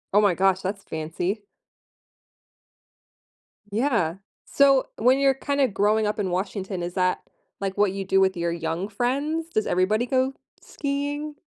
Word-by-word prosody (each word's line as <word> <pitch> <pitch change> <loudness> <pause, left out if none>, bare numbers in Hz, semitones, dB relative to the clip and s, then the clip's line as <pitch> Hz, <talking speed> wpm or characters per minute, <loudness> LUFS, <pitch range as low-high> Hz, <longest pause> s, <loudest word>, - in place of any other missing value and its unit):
Oh 210 - +7
my 195 -4 +3
gosh, 190 0 +2
that's 195 +1 -4
fancy. 175 +6 -3 2.3
Yeah. 220 - +1 0.3
So, 275 -2 +4
when 250 +4 +4
you're 275 -1 +4
kinda 280 0 0
growing 210 +1 +2
up 210 +1 -1
in 195 -3 0
Washington, 190 0 -3
is 175 0 -4
that, 185 -1 0 0.3
like, 195 -1 -3
what 205 -1 +3
you 195 0 -4
do 195 +1 +3
with 190 -1 +2
your 170 0 -1
young 170 +3 -3
friends? 285 +9 -1
Does 215 -8 0
everybody 210 +6 +1
go 260 +1 +1 0.3
skiing? 290 +1 -3
205 Hz, 145 wpm, -25 LUFS, 185-265 Hz, 2.3 s, Oh